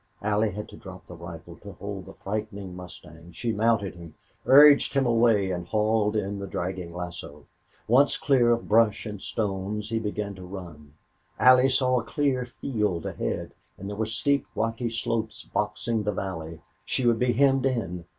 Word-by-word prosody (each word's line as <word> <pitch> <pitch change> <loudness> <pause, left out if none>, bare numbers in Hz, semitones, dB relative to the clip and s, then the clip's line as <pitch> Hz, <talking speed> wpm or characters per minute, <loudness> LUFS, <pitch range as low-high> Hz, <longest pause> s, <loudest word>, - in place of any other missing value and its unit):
Allie 105 +1 +2
had 105 +1 -6
to - - -12
drop 95 -1 -11
the 90 - -11
rifle 85 0 -10
to 100 -1 -11
hold 100 +1 -7
the - - -11
frightened 100 -2 -5
mustang. 85 -2 -12
She 115 +7 -2
mounted 110 -2 +1
him, 85 -3 -12 0.3
urged 145 +1 +7
him 135 -1 +3
away, 115 -5 +3
and 90 -1 -4
hauled 110 0 +1
in 100 -1 -2
the 100 - -5
dragging 90 -1 -4
lasso. 85 -4 -7 0.4
Once 135 +5 +4
clear 135 -6 +3
of 115 0 0
brush 110 0 +3
and 105 -3 -6
stones, 105 0 -3
he 115 0 0
began 105 -1 -3
to 95 -1 -11
run. 85 -6 -10 0.4
Allie 130 +1 +6
saw 130 -1 +2
a - - -5
clear 130 0 0
field 105 -8 -2
ahead, - - -3 0.3
but 100 - -9
there 100 +1 -5
were 110 +1 -1
steep 140 +5 0
rocky 115 +2 -1
slopes 115 -1 -3
boxing 105 +2 -1
the 105 0 -1
valley. 80 -5 -5 0.2
She 130 - -1
would 115 -1 +3
be 125 -1 +2
hemmed 135 +1 +3
in. 90 -9 -3
105 Hz, 175 wpm, -26 LUFS, 90-115 Hz, 0.4 s, urged